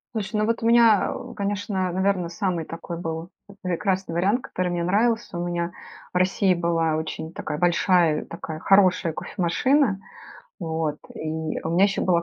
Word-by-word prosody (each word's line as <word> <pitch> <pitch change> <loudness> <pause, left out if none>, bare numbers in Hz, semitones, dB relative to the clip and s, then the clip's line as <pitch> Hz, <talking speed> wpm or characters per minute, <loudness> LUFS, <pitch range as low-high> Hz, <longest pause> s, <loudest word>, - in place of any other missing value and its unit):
Слушай, 210 0 -2
ну 210 - +2
вот 230 +1 -1
у - - +2
меня, 230 -3 +5
а, - - -2
о, - - -8
конечно, 200 -2 -2
наверно, 190 -1 0
самый 175 -1 -1
такой 165 +2 -7
был, 165 0 -5 0.2
э, - - -11
прекрасный 185 0 -1
вариант, 195 +8 +2
который 180 -5 -3
мне 175 -1 -1
нравился. 220 +3 +1
У 175 - -2
меня 175 0 -2 0.4
в - - +1
России 185 +1 +3
была 165 -2 +1
очень 160 +1 -4
такая 150 -2 -4
большая, 175 -2 +3
такая 160 -1 -7
хорошая 185 -2 +4
кофемашина. 200 - +1 0.6
Вот. 160 -3 -2 0.2
И 160 0 -3
у 160 - -1
меня 175 +3 +3
еще 200 0 +3
была 170 -2 +2
180 Hz, 170 wpm, -24 LUFS, 165-200 Hz, 0.6 s, меня